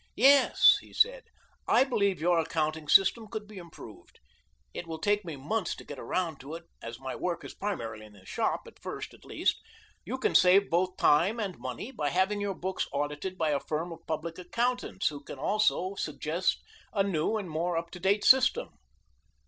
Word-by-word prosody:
"Yes," 275 Hz, +3 st, +6 dB
he -, -, -17 dB
said, -, -, +2 dB, 0.4 s
"I -, -, +5 dB
believe 200 Hz, -8 st, 0 dB
your 170 Hz, +1 st, +3 dB
accounting 155 Hz, -1 st, -1 dB
system 205 Hz, +7 st, +5 dB
could 215 Hz, 0 st, -6 dB
be 210 Hz, -2 st, -10 dB
improved 170 Hz, -2 st, -13 dB, 0.5 s
it 175 Hz, -, -6 dB
will 160 Hz, -1 st, -5 dB
take 205 Hz, +3 st, +1 dB
me 165 Hz, -4 st, -6 dB
months 175 Hz, +8 st, -2 dB
to -, -, -11 dB
get 145 Hz, -3 st, -9 dB
around 170 Hz, -5 st, -2 dB
to 145 Hz, +4 st, -8 dB
it, 170 Hz, -, -9 dB, 0.2 s
as 115 Hz, +1 st, -7 dB
my 130 Hz, -1 st, -5 dB
work 175 Hz, -2 st, -3 dB
is -, -, -8 dB
primarily 115 Hz, -, -5 dB
in 105 Hz, -, -19 dB
the 95 Hz, -2 st, -18 dB
shop, -, -, -1 dB
at -, -, -16 dB
first, -, -, -6 dB
at -, -, -18 dB
least. -, -, -1 dB, 0.4 s
You 245 Hz, +8 st, -4 dB
can 260 Hz, -, 0 dB
save 190 Hz, +2 st, +5 dB
both 180 Hz, +2 st, +1 dB
time 175 Hz, +10 st, +3 dB
and 195 Hz, -5 st, -3 dB
money 130 Hz, -, -6 dB
by 150 Hz, -, -2 dB
having 190 Hz, +5 st, +1 dB
your 200 Hz, -1 st, -2 dB
books 185 Hz, +2 st, -3 dB
audited 145 Hz, +6 st, -3 dB
by 160 Hz, -3 st, +1 dB
a 145 Hz, -, +1 dB
firm 160 Hz, +5 st, -3 dB
of 165 Hz, -, -8 dB
public 165 Hz, +2 st, -4 dB
accountants 235 Hz, 0 st, -1 dB
who 145 Hz, -2 st, -8 dB
can -, -, -9 dB
also 200 Hz, +3 st, +1 dB
suggest 165 Hz, 0 st, -2 dB, 0.3 s
a 200 Hz, -, +2 dB
new 195 Hz, +2 st, 0 dB
and 200 Hz, -3 st, -5 dB
more 165 Hz, +2 st, -1 dB
up 170 Hz, 0 st, -4 dB
to 180 Hz, -, -9 dB
date 195 Hz, +3 st, +1 dB
system." 265 Hz, -, +5 dB
180 Hz, 195 wpm, -29 LUFS, 155-205 Hz, 0.5 s, Yes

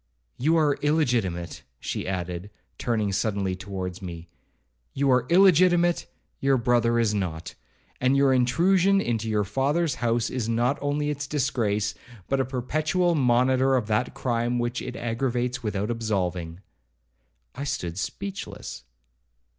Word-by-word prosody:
You 160 Hz, +6 st, +3 dB
are 150 Hz, -3 st, +2 dB
illegitimate,' 120 Hz, -, 0 dB, 0.2 s
she -, -, -4 dB
added, 90 Hz, 0 st, -4 dB, 0.3 s
turning 110 Hz, -4 st, 0 dB
suddenly 100 Hz, -2 st, 0 dB
towards 95 Hz, -1 st, -6 dB
me; 85 Hz, -2 st, -8 dB, 0.7 s
'you 140 Hz, 0 st, +2 dB
are 125 Hz, -1 st, +3 dB
illegitimate,—your 175 Hz, -6 st, +3 dB
brother 120 Hz, -1 st, +2 dB
is 115 Hz, -3 st, +2 dB
not; 85 Hz, -5 st, -3 dB, 0.5 s
and 130 Hz, +2 st, +3 dB
your 140 Hz, -1 st, +4 dB
intrusion 180 Hz, +10 st, +3 dB
into 115 Hz, -, -1 dB
your 105 Hz, -1 st, +1 dB
father's 140 Hz, -, 0 dB
house 120 Hz, 0 st, +1 dB
is 120 Hz, -3 st, -2 dB
not 120 Hz, +5 st, +1 dB
only 145 Hz, +1 st, 0 dB
its 145 Hz, -1 st, -4 dB
disgrace, 110 Hz, -7 st, 0 dB, 0.3 s
but 135 Hz, -, 0 dB
a 135 Hz, -, +2 dB
perpetual 155 Hz, +7 st, 0 dB
monitor 130 Hz, -1 st, +3 dB
of 125 Hz, -4 st, +1 dB
that 105 Hz, +4 st, 0 dB
crime 120 Hz, -2 st, 0 dB
which 120 Hz, 0 st, -2 dB
it 125 Hz, -1 st, -6 dB
aggravates 125 Hz, +1 st, -2 dB
without 105 Hz, -1 st, -2 dB
absolving.' 95 Hz, -6 st, -2 dB, 0.9 s
I 140 Hz, -, -6 dB
stood 90 Hz, -, -3 dB
speechless. 190 Hz, -, -6 dB
120 Hz, 130 wpm, -26 LUFS, 105-140 Hz, 0.9 s, your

